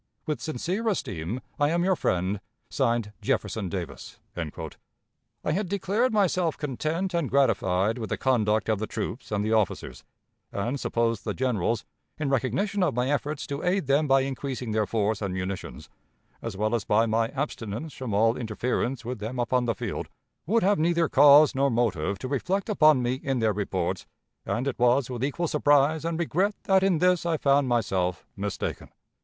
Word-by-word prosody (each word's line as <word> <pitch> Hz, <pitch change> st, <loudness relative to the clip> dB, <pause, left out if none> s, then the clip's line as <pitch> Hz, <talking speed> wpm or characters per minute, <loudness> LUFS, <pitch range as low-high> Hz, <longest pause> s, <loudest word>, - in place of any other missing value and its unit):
"With 155 Hz, -2 st, -2 dB
sincere 175 Hz, -, -2 dB
esteem, 115 Hz, -, -2 dB, 0.2 s
I 145 Hz, 0 st, +3 dB
am 170 Hz, +2 st, +1 dB
your 190 Hz, 0 st, +3 dB
friend, 95 Hz, -, -1 dB, 0.3 s
(Signed) 115 Hz, -5 st, 0 dB
"Jefferson 105 Hz, -1 st, -1 dB
Davis." 90 Hz, -2 st, -6 dB, 0.2 s
I 85 Hz, -, -8 dB
had 190 Hz, +3 st, -1 dB
declared 200 Hz, +6 st, +1 dB
myself 185 Hz, -6 st, +1 dB
content 155 Hz, +6 st, -2 dB
and 170 Hz, -5 st, 0 dB
gratified 110 Hz, -5 st, +2 dB
with 110 Hz, -, -4 dB
the -, -, -1 dB
conduct 110 Hz, -5 st, +1 dB
of 110 Hz, -2 st, +1 dB
the 110 Hz, -, -3 dB
troops 120 Hz, -, -5 dB
and 105 Hz, 0 st, 0 dB
the 110 Hz, -, +1 dB
officers, 95 Hz, -, -1 dB, 0.5 s
and 120 Hz, +8 st, -2 dB
supposed 115 Hz, -3 st, 0 dB
the -, -, -3 dB
generals, 115 Hz, -3 st, 0 dB, 0.3 s
in 145 Hz, -3 st, -1 dB
recognition 135 Hz, -, 0 dB
of 180 Hz, -, +1 dB
my 125 Hz, +3 st, +1 dB
efforts 145 Hz, +1 st, -2 dB
to 140 Hz, 0 st, -4 dB
aid 185 Hz, -1 st, +1 dB
them 140 Hz, +3 st, +2 dB
by 135 Hz, 0 st, +5 dB
increasing 130 Hz, -3 st, -4 dB
their 105 Hz, -1 st, +1 dB
force 110 Hz, -1 st, 0 dB
and 95 Hz, -3 st, -2 dB
munitions, 95 Hz, +1 st, -5 dB, 0.5 s
as 115 Hz, -4 st, -5 dB
well 110 Hz, +2 st, 0 dB
as 115 Hz, -3 st, +1 dB
by 110 Hz, +2 st, +3 dB
my 115 Hz, 0 st, +1 dB
abstinence 135 Hz, 0 st, -4 dB
from 130 Hz, -4 st, -5 dB
all 115 Hz, +3 st, +3 dB
interference 120 Hz, +2 st, -2 dB
with 125 Hz, -1 st, -4 dB
them 110 Hz, +5 st, -5 dB
upon 125 Hz, +1 st, +1 dB
the 115 Hz, -2 st, 0 dB
field, -, -, -4 dB, 0.4 s
would 225 Hz, +4 st, +2 dB
have 200 Hz, 0 st, +3 dB
neither 170 Hz, 0 st, +2 dB
cause 145 Hz, +1 st, +7 dB
nor 140 Hz, +1 st, +2 dB
motive 100 Hz, -7 st, 0 dB
to 130 Hz, -, -5 dB
reflect 185 Hz, -, -1 dB
upon 155 Hz, -10 st, +5 dB
me 125 Hz, +2 st, -1 dB
in 135 Hz, -1 st, -1 dB
their 110 Hz, -3 st, +2 dB
reports, 95 Hz, -3 st, -2 dB, 0.4 s
and 125 Hz, +4 st, -1 dB
it 135 Hz, -, -3 dB
was 125 Hz, +2 st, +3 dB
with 125 Hz, 0 st, -4 dB
equal 155 Hz, +5 st, -1 dB
surprise 145 Hz, +1 st, +3 dB
and 165 Hz, 0 st, -2 dB
regret 185 Hz, +5 st, 0 dB
that 190 Hz, -1 st, +4 dB
in 190 Hz, -3 st, +3 dB
this 180 Hz, +1 st, +3 dB
I 170 Hz, -2 st, 0 dB
found 140 Hz, -1 st, +3 dB
myself 95 Hz, -8 st, 0 dB
mistaken. 100 Hz, 0 st, -4 dB
130 Hz, 175 wpm, -26 LUFS, 110-155 Hz, 0.5 s, cause